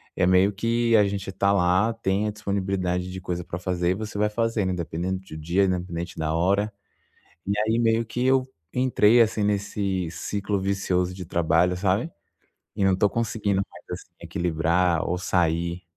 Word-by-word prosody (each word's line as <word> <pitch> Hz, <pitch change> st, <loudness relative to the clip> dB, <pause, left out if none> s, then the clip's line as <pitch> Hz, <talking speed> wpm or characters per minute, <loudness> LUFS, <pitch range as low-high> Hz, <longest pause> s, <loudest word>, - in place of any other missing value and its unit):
é -, -, +2 dB
meio 95 Hz, +2 st, +4 dB
que 115 Hz, +2 st, +1 dB
a 105 Hz, -2 st, +6 dB
gente 100 Hz, -1 st, -4 dB
tá 100 Hz, +1 st, +1 dB
lá, 95 Hz, +4 st, +3 dB
tem 105 Hz, -1 st, -1 dB
a -, -, -1 dB
disponibilidade 95 Hz, -3 st, -2 dB
de 95 Hz, 0 st, -7 dB
coisa 90 Hz, -1 st, -3 dB
pra 85 Hz, 0 st, -6 dB
fazer 90 Hz, -1 st, 0 dB
e -, -, +3 dB
você 110 Hz, +1 st, -6 dB
vai 105 Hz, +1 st, +2 dB
fazendo, 110 Hz, -3 st, 0 dB
independente 90 Hz, +2 st, -3 dB
de 80 Hz, -4 st, -9 dB
dia, 85 Hz, +6 st, +1 dB
independente 90 Hz, -2 st, -3 dB
da 80 Hz, 0 st, -1 dB
hora. 100 Hz, +5 st, +1 dB, 0.7 s
E 100 Hz, -, -1 dB
aí, 110 Hz, +2 st, +1 dB
meio 115 Hz, 0 st, +2 dB
que 120 Hz, +3 st, -2 dB
eu 130 Hz, 0 st, +3 dB, 0.3 s
entrei, 120 Hz, -2 st, +4 dB
assim, 110 Hz, -1 st, +2 dB
nesse 100 Hz, -3 st, -1 dB
ciclo 100 Hz, +3 st, -2 dB
vicioso 95 Hz, -2 st, 0 dB
de 90 Hz, -1 st, -7 dB
trabalho, 85 Hz, +2 st, +2 dB
sabe? 100 Hz, -, 0 dB, 0.7 s
E 100 Hz, -, +1 dB
não 95 Hz, -, +4 dB
tô 100 Hz, +1 st, +3 dB
conseguindo 105 Hz, -4 st, 0 dB
mais, 85 Hz, -, -15 dB, 0.2 s
assim, 85 Hz, -, -20 dB
equilibrar 85 Hz, 0 st, 0 dB
ou 90 Hz, -, 0 dB
sair. 85 Hz, -1 st, 0 dB
95 Hz, 175 wpm, -25 LUFS, 90-105 Hz, 0.7 s, a